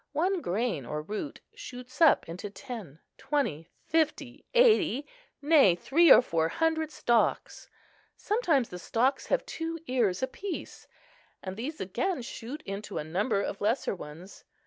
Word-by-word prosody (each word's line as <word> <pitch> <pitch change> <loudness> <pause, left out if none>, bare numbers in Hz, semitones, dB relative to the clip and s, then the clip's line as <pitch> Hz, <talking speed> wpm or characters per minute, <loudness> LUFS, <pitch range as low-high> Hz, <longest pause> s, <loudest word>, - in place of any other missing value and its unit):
One 360 +5 +1
grain 200 - -1
or 150 +5 -4
root 215 - -5
shoots 255 - -10
up 320 - +5
into 180 +5 -6
ten, 205 - -8 0.2
twenty, 180 - -1 0.2
fifty, 305 -5 -1
eighty, 410 - +4 0.4
nay, 285 - +6
three 315 - +4
or - - +9
four 165 -6 0
hundred 320 - 0
stalks: 240 -6 0 0.5
sometimes 345 - +1
the 180 - -7
stalks 250 +9 0
have - - +1
two 330 0 -4
ears 240 - 0
apiece, 365 +8 -5 0.6
and 185 -1 -5
these 285 +9 -5
again 260 - -2
shoot 255 +6 -7
into 195 +2 -6
a - - -2
number 200 +6 0
of 200 - -5
lesser 220 +6 +1
ones. 175 +2 -10
250 Hz, 140 wpm, -29 LUFS, 190-315 Hz, 0.6 s, or